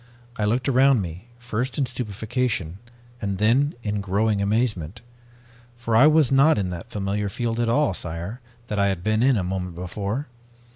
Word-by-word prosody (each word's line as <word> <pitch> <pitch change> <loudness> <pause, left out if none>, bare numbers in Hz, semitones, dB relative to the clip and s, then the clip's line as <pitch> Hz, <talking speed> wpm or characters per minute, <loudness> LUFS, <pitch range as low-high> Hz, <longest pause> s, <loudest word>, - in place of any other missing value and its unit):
I 105 - -1
looked 120 +6 0
around 135 -3 +4
me, 85 +4 -8
first 120 +1 -3
in 140 - +2
stupefaction, 110 -6 -3 0.4
and 100 -3 -2
then 125 +8 +2
in 105 -1 -2
growing 100 +2 +1
amazement. 105 -3 -1 0.8
For 115 -1 -1
I 130 +7 +7
was 155 -3 +4
not 140 +2 +5
in 95 -3 -1
that 85 -1 -7
familiar 100 0 -2
field 115 +3 -2
at 120 -1 +1
all, 145 -2 +2
sire, 85 +8 -5 0.2
that 105 -3 -3
I 100 - +3
had 95 -3 -2
been 110 +2 +1
in 130 -1 +4
a 95 - 0
moment 90 -1 -3
before. 100 - -3
110 Hz, 175 wpm, -24 LUFS, 95-125 Hz, 0.8 s, I